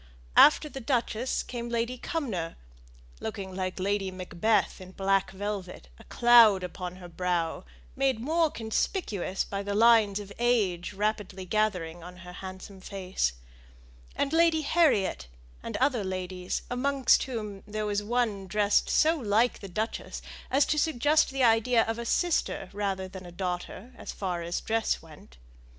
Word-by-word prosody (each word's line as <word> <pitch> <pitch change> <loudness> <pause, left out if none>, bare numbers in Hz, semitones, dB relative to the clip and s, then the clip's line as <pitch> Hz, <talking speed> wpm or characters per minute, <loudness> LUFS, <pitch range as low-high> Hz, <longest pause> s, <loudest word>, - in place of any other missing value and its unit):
After 305 0 +7
the 270 - -7
duchess 245 0 -1
came 240 -1 -6
Lady 235 +1 -1
Cumnor, 215 - -3 0.6
looking 200 -4 -5
like 185 0 -3
Lady 195 0 0
Macbeth 185 +3 0
in 185 0 -11
black 195 0 +1
velvet 195 - -5
a - - -13
cloud 230 -5 +6
upon 180 0 -6
her 180 -1 -10
brow, 170 - -2 0.3
made 265 -4 +1
more 320 +6 +2
conspicuous 220 - -2
by 200 0 -4
the 200 0 -3
lines 220 -2 +5
of 200 -1 -9
age 210 -8 +1
rapidly 205 -2 -2
gathering 180 -5 -1
on 180 +1 -10
her 180 - -9
handsome 190 +1 -9
face; 185 - -2 0.8
and 285 +2 -1
Lady 330 -1 +4
Harriet, 280 - +2 0.3
and - - -4
other 255 -5 +1
ladies, 185 -1 -4
amongst 270 +1 +3
whom 215 -6 -5
there 215 0 -3
was 205 0 0
one 215 -3 -1
dressed 210 0 +2
so 320 +2 +4
like 230 -3 +1
the 195 - -9
duchess 215 +5 -4 0.3
as 275 +2 +4
to 305 - +1
suggest 300 +1 +3
the 270 -1 -1
idea 230 0 +4
of 225 +1 -3
a 235 - -4
sister 335 - 0
rather 195 -2 -2
than 185 0 -10
a 175 - -10
daughter, 185 +6 -5
as - - -6
far 180 -3 -3
as 170 +1 -3
dress 225 -5 0
went. 150 - -15
205 Hz, 150 wpm, -28 LUFS, 185-240 Hz, 0.8 s, After